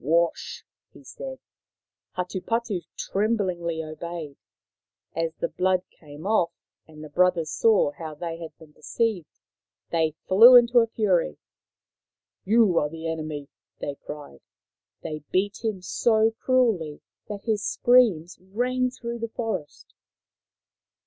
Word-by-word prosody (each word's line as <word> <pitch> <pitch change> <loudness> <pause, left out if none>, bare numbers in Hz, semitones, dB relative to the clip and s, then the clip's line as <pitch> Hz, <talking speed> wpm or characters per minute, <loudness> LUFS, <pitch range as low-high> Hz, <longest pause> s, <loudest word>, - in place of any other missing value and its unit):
" - - -25
Wash! 170 0 -1
" - - -54
he - - -15
said. - - -8 0.8
Hatupatu 190 +2 -2 0.2
tremblingly 185 -6 -1
obeyed. 155 -1 -7 0.8
As 165 0 -1
the - - -2
blood 185 0 +1
came 150 +1 -13
off, 200 -5 +2 0.4
and 155 -1 -12
the 155 - -9
brothers 175 -1 +2
saw 215 -10 +3
how 155 +1 -8
they 165 +1 -5
had 165 -1 -6
Hatupatu - - -61
"3 160 - -14
been 150 - -23
deceived, 175 - -2 0.5
they 160 -2 +1
flew 230 +7 +9
into 240 0 +7
a 230 - +3
fury. 185 - +1 0.6
" - - -62
You 215 -7 +5
are 150 - -1
the 165 +1 -6
enemy! 155 -3 -4 0.2
" - - -55
they 145 - -3
cried. 140 - -10 0.6
They 155 -1 -4
beat 200 +4 -1
him 210 -5 -2
so 220 +3 +2
cruelly 225 - +1 0.3
that 205 -1 -6
his 215 -3 0
screams 210 -8 +3
rang 250 +7 -1
through 235 -1 -6
the 230 0 -3
forest. 220 -10 -5
180 Hz, 140 wpm, -25 LUFS, 160-225 Hz, 0.8 s, flew